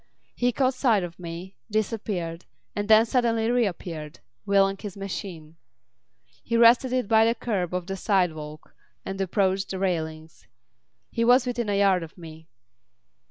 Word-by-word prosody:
He 245 0 +1
caught 260 +2 +1
sight 230 -7 +2
of 170 0 -7
me, 175 +2 -8
disappeared, 200 -6 -3 0.3
and 205 0 -2
then 220 +1 +6
suddenly 230 -2 +1
reappeared, 175 -10 -2 0.3
wheeling 195 0 +3
his 205 -2 -7
machine. 175 -5 -7 0.8
He 230 - -1
rested 240 +2 +6
it 255 -4 0
by 220 +1 +5
the 230 +1 +2
kerb 195 -9 -2
of 180 -1 -3
the 195 +1 -4
sidewalk 160 -7 -1 0.3
and 195 0 -4
approached 195 0 0
the 190 - -4
railings. 160 -4 -3 0.6
He 230 - 0
was 245 +2 +5
within 240 -3 -2
a 200 - +1
yard 195 -2 +3
of 165 +2 -10
me. 160 -2 -12
195 Hz, 150 wpm, -25 LUFS, 175-230 Hz, 0.8 s, then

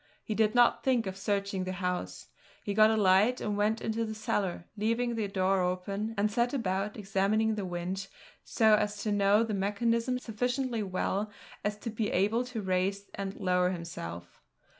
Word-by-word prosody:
He 215 - -3
did 215 +1 +2
not 240 -1 +4
think 250 -4 +2
of 190 -1 -4
searching 200 -1 -1
the 185 0 -3
house. 180 -1 -3 0.3
He 205 - -2
got 215 +1 +6
a 220 - +2
light 205 +5 +4
and 210 -1 -2
went 210 +2 +1
into 225 +1 -1
the 220 -1 -4
cellar, 195 -5 -2
leaving 230 +3 0
the 220 -3 -1
door 190 -1 +1
open, 195 +5 -2
and 210 +1 +2
set 240 +5 +1
about 200 -3 -1
examining 210 +2 +1
the 205 -2 -3
winch, 180 +2 -4 0.4
so 220 -2 +3
as 210 -1 +1
to 215 - 0
know 205 +2 +4
the 225 -2 -3
mechanism 230 +5 0
sufficiently 245 0 -2
well 200 +1 -1 0.3
as 210 0 -1
to 230 +2 -5
be 215 -1 -1
able 210 +6 +2
to 240 -4 -5
raise 190 +2 -1
and 195 0 -4
lower 180 -2 +2
himself. 85 - -7
205 Hz, 180 wpm, -30 LUFS, 190-220 Hz, 0.4 s, got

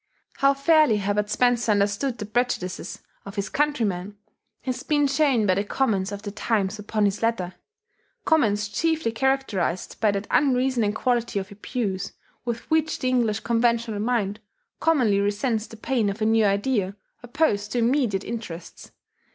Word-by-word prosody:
How 275 0 +4
fairly 300 -5 +4
Herbert 205 +1 -1
Spencer 240 0 +2
understood 205 +5 +1
the 210 - -5
prejudices 215 -4 -2 0.2
of 195 +1 -9
his 200 0 -2
countrymen 210 -10 -1 0.5
has 255 -2 -3
been 295 -1 +2
shown 275 -5 +2
by 185 - +4
the 200 +2 0
comments 205 -4 0
of 205 0 -6
the 205 - -5
Times 210 -1 -1
upon 210 +1 -1
this 200 -1 +1
letter, 225 -6 0 0.7
comments 215 -10 +2
chiefly 315 +4 0
characterized 225 -8 -1
by 215 - +3
that 200 0 -1
unreasoning 255 -6 +2
quality 240 -1 0
of 195 +1 -4
abuse 200 -2 -3 0.3
with 235 -1 -2
which 315 0 +2
the 255 - -1
English 230 -4 +1
conventional 235 -2 +1
mind 215 -2 0 0.4
commonly 250 -11 +3
resents 215 +3 0
the 225 - -12
pain 230 -2 0
of 200 +2 -5
a 215 - 0
new 220 0 +4
idea 200 -1 +1 0.3
opposed 240 -5 0
to 245 - -1
immediate 235 -5 +1
interests. 215 -8 -7
225 Hz, 150 wpm, -24 LUFS, 205-255 Hz, 0.7 s, How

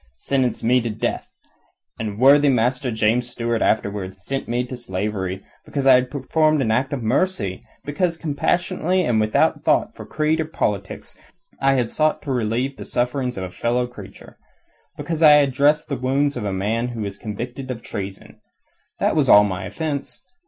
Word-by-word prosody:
sentenced 130 - -1
me 125 +2 +3
to 115 - -3
death, 110 0 -3 0.7
and 110 - -2
his 100 - -8
worthy 140 +4 +6
master 125 +1 +1
James 115 +2 +1
Stuart 115 -1 -2
afterwards 100 -3 -1
sent 135 0 -3
me 120 +1 0
into 125 +1 -6
slavery, 95 -4 -4 0.2
because 140 -2 -3
I 135 - +8
had 125 0 +3
performed 155 +3 +1
an 120 -5 +1
act 130 +4 0
of 135 -5 -3
mercy; 110 - -1 0.2
because 165 +3 -1
compassionately 175 +3 0
and 115 -7 +1
without 110 0 +1
thought - - +1
for - - -10
creed 155 +1 0
or - - -2
politics 100 - -4 0.4
I 135 0 +3
had 125 -3 0
sought 155 0 +1
to 145 - -4
relieve 125 +3 -1
the - - -7
sufferings 125 0 -1
of 95 - -3
a 90 - -6
fellow 120 +5 0
creature; 105 -5 -13 0.6
because 165 -1 -4
I 150 -2 +8
had 145 -3 +4
dressed 145 +3 +2
the 140 - -2
wounds 135 +3 0
of - - -4
a 100 - -1
man 105 +5 -1
who 120 -2 -5
was 100 -1 -5
convicted 120 +4 -6
of 115 -3 -5
treason. 95 -1 -7 0.6
That - - +1
was - - +2
all 105 - +8
my 95 -2 -3
offence. 145 - -4
125 Hz, 180 wpm, -22 LUFS, 110-140 Hz, 0.7 s, I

